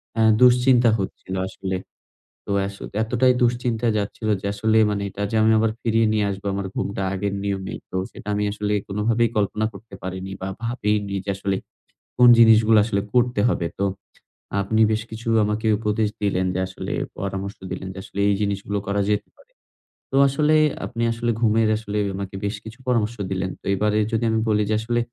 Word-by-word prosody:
এ্যাঁ 110 -1 +4
দুশ্চিন্তা 125 -1 +5
হচ্ছিল 95 0 -5
আসলে। 95 0 -4 0.7
তো - - -3 0.2
আস 100 - -8 0.3
এতটাই 125 +3 +3
দুশ্চিন্তা 120 -1 +1
যাচ্ছিল 105 +2 -3
যে - - -7
আসলে 110 +2 +1
মানে 100 -1 -1
এটা 100 - -7
যে - - -1
আমি 110 - +4
আবার 110 0 +2
ফিরিয়ে 115 -1 +2
নিয়ে 105 -1 +1
আসবো 95 +1 -6
আমার 100 -1 -3
ঘুমটা 100 0 -2
আগের 100 +1 -2
নিয়মে, 95 -1 -3 0.2
তো - - -8 0.2
সেটা - - -12
আমি 105 - 0
আসলে 105 0 -2
কোনভাবেই 115 +3 +1
কল্পনা 105 +1 0
করতে 100 0 -12
পারিনি 95 +1 -5
বা, 95 - -3 0.2
ভাবিই 110 -3 0
নি 100 - -4
যে 100 - -4
আসলে 100 0 -1 0.6
কোন 125 0 +7
জিনিসগুলো 110 -1 +6
আসলে 100 -2 0
করতে 120 -3 +2
হবে। 85 - 0
তো 100 - +1 0.8
আপনি 110 +3 +1
বেশ 110 - 0
কিছু 115 +2 -8 0.2
আমাকে 105 +2 -1
উপদেশ 105 -1 0
দিলেন 95 -2 +1
যে - - 0
আসলে 95 - -6 0.3
পরামর্শ 100 0 -4
দিলেন 95 +1 -5
যে - - -13
আসলে 100 - -8
এই 100 - +3
জিনিসগুলো 100 0 -2
করা 100 0 +1
যেতে 105 0 0
পারে। - - -24 0.6
তো - - -2
আসলে 150 +3 +2 0.3
আপনি 115 -1 -3
আসলে 120 +1 -1
ঘুমের 110 0 +3
আসলে 105 -1 -5 0.2
আমাকে 100 0 -6
বেশ 100 +1 -2
কিছু 110 +3 -11
পরামর্শ 115 -2 +1 0.2
দিলেন। 95 0 -2
তো - - -21
এবারে 105 +2 +1
যদি 115 +1 0
আমি 110 - +1
বলি 105 0 +3
যে 110 - +2
আসলে 120 +1 0
105 Hz, 185 wpm, -23 LUFS, 100-115 Hz, 0.8 s, কোন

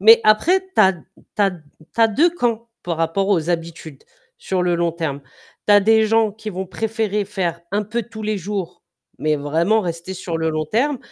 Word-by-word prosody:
Mais 225 +3 +8
après, 315 - +4
tu - - +4
as 190 -2 +6
tu 180 - -12 0.4
as 200 -1 +4
tu 180 -3 -11 0.4
as 225 - +6
2 305 +11 +3
camps 235 -8 -2
par 170 -2 -3
rapport 165 +5 0
aux 170 -5 +1
habitudes, 165 -4 -5 0.3
sur 185 -1 -2
le 175 -1 +1
long 170 -1 0
terme. 160 -4 -3 0.5
Tu 210 - +5
as 205 - +7
des 220 +2 +4
gens 225 -1 +2
qui 215 +1 -7
vont 190 0 -4
préférer 215 0 -2
faire 180 -4 -3
un 205 +1 +1
peu 225 +4 -3
tous 220 -1 -10
les 215 0 -1
jours, 195 -1 -5 0.4
mais 155 0 +1
vraiment 165 +9 +1
rester 170 -1 -5
sur 175 -2 -4
le 160 0 0
long 155 0 -2
terme 255 - 0
195 Hz, 205 wpm, -20 LUFS, 170-220 Hz, 0.5 s, Mais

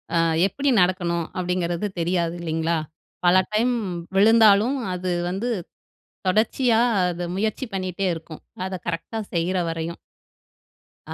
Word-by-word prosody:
அ - - +4 0.3
எப்டி 275 +8 -1
நடக்கணும் 175 -2 +1
அப்டிங்கிறது 180 +1 -1
தெரியாது 170 0 0
இல்லிங்களா? 165 0 0 0.5
பல 175 +1 +6 0.2
டைம் 240 +4 +2 0.4
விழுந்தாலும் 220 +4 +5 0.2
அது 180 0 -2 0.2
வந்து 195 +7 -2 0.8
தொடர்ச்சியா 225 +3 +3 0.3
அத 175 0 -4
முயற்சி 215 +6 -1
பண்ணிட்டே 185 0 -2
இருக்கும். 160 -1 -10 0.2
அத 190 - -5
கரெக்ட்டா 175 +7 -3
செய்யுற 175 +3 0
வரையும். 165 +1 -4 1.1
அ - - -4
185 Hz, 115 wpm, -23 LUFS, 170-215 Hz, 1.1 s, பல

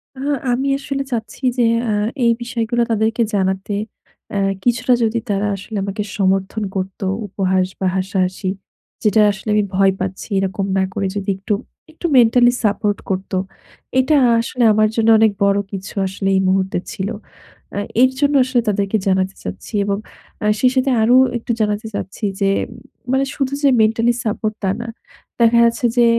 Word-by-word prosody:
আহ 265 +2 -5 0.2
আমি 265 +3 0
আসলে 275 0 -3
চাচ্ছি 230 +2 -5
যে 245 - +3 0.3
আ - - +1 0.3
এই 235 - +5
বিষয়গুলা 235 0 -1
তাদেরকে 225 +2 +1
জানাতে। 190 +1 -1 0.6
অ্যা 200 - -2 0.3
কিছুটা 245 +1 +2
যদি 225 +1 +1
তারা 200 +1 0
আসলে 210 +3 -7
আমাকে 200 +1 -3
সমর্থন 195 +2 0
করত, 190 0 -4 0.3
উপহাস 190 -1 +1
বা 190 - 0
হাসাহাসি। 185 0 -1 0.5
যেটা 215 0 +4
আসলে 200 +2 -7
আমি 210 - +3
ভয় 195 0 +4
পাচ্ছি 190 +3 -4
এরকম 195 0 -1
না 190 - +3
করে 195 - -1
যদি 200 0 -3
একটু, 195 +2 -2 0.4
একটু 320 - -9
মেন্টালি 240 +1 +5
সাপোর্ট 205 -1 +1
করতো। 190 0 -2 0.6
এটা 280 +4 +3 0.2
আসলে 240 +2 -1
আমার 215 0 +4
জন্য 225 -1 +2
অনেক 220 -1 +5
বড় 200 0 +3
কিছু 195 -1 -6
আসলে 195 +1 -4
এই 190 - +3
মুহূর্তে 190 0 +1
ছিল। 190 +1 -3 0.7
আ 205 - -1 0.2
এর 260 0 +5
জন্য 285 0 +2
আসলে 250 -2 +1
তাদেরকে 200 +1 0
জানাতে 190 0 +1
চাচ্ছি। 90 - -7
এবং 200 0 0 0.5
আ - - 0
সেই 255 +2 +4
সাথে 260 +1 +2
আরো 235 +3 +4 0.2
একটু 235 - -4
জানাতে 210 +1 0
চাচ্ছি 200 +2 -6 0.2
যে 195 - +2 0.6
মানে 265 +1 +2
শুধু 275 -1 -1
যে 280 - +6
মেন্টালি 225 +2 +3
সাপোর্ট 215 0 -2
তা 190 - +1
না। 235 - -6 0.5
দেখা 235 0 +5
যাচ্ছে 235 +2 0
যে 240 - +6
210 Hz, 165 wpm, -19 LUFS, 195-235 Hz, 0.7 s, যে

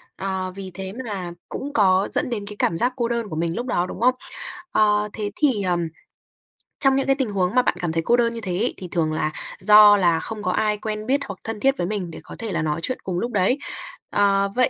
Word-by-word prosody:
Ờ, 190 -1 -3
vì 195 -1 -7
thế 190 +1 -6
mà 190 -5 -4 0.2
cũng 285 +1 -5
có 190 -2 +4
dẫn - - -1
đến 215 -4 -3
cái 210 - -7
cảm 165 - +1
giác 245 +8 +1
cô 240 -2 0
đơn 235 -2 -1
của 155 - -5
mình 165 +1 -1
lúc 240 - -3
đó, 175 -7 +1
đúng 185 - -7
không? 255 +1 +4 0.6
Ờ, 210 0 +3
thế 205 -2 -3
thì, 260 -9 +2
ờm, 175 -2 0 0.9
trong 270 -1 +4
những 270 - +1
cái 270 - +4
tình 265 -5 -1
huống 190 +1 0
mà 250 - +6
bạn - - +1
cảm 175 -2 -1
thấy 165 0 -1
cô 240 +7 +3
đơn 235 -1 +2
như 230 - -5
thế 185 -4 -2
ấy, 230 +6 0
thì 185 - -7
thường 160 -3 0
là 155 0 0 0.3
do 210 -1 +8
là 170 -4 +3
không 215 +2 -6
có 185 - +1
ai 210 +1 +1
quen 215 0 -4
biết 275 +2 +2
hoặc - - -8
thân 225 -1 -4
thiết 270 +4 +2
với 175 - -1
mình 190 -4 -3
để - - -8
có - - -10
thể 225 -2 -4
là - - 0
nói 155 0 -1
chuyện 255 - -2
cùng 180 -2 -2
lúc 240 +4 -2
đấy. 210 +5 +2 0.5
Ờ, 200 -1 +3
vậy 255 0 +3
205 Hz, 255 wpm, -23 LUFS, 185-235 Hz, 0.9 s, do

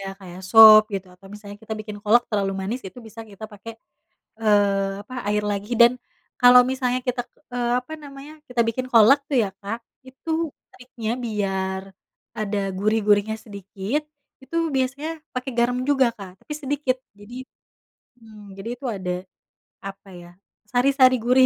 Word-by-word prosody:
ya 195 - -7
kayak 180 -1 -10
sop 220 -1 +10
gitu. 195 -1 -4
Atau 195 +2 -18
misalnya 205 -1 -10
kita 220 - -7
bikin 210 -1 -8
kolak 225 +4 +4
terlalu 200 -2 0
manis, 225 +7 -3
itu 245 - -15
bisa 225 +1 -11
kita 200 +2 -10
pake, 205 +3 -10 0.7
eee, 200 -2 +2
apa, 255 +5 -12
air 210 0 +1
lagi. 205 +3 -5
Dan, 235 +1 +7 0.5
kalau 250 0 +9
misalnya 255 -1 -1
kita 250 0 0
ke 250 -4 -10 0.2
apa 255 - -13
namanya, 280 +1 -11 0.2
kita 250 -1 -1
bikin 255 +3 -2
kolak 230 +5 +7
tuh 275 - +1
ya 195 - -4
Kak, 210 +4 -5 0.3
itu 265 +5 -9 0.4
triknya 245 -3 -7
biar 190 -3 -2 0.6
ada 210 -1 -2 0.2
gurih-gurihnya 210 +1 +2
sedikit, 200 +6 -4 0.4
itu 265 +5 -7 0.2
biasanya 270 +4 -1 0.3
pakai 255 +1 -3
garam 245 +1 +2
juga 270 -3 +4
Kak, 195 -4 -10
tapi - - -7
sedikit. 280 -2 -1 0.2
Jadi 205 +4 -12 0.9
mmm, 215 -3 -14
jadi 195 +4 -7
itu 245 - -22
ada, 185 -2 -4 0.8
apa 195 0 -11
ya, 175 - -13 0.4
sari-sari 255 +1 +4
gurih, 255 +1 +5
220 Hz, 155 wpm, -23 LUFS, 200-255 Hz, 0.9 s, sop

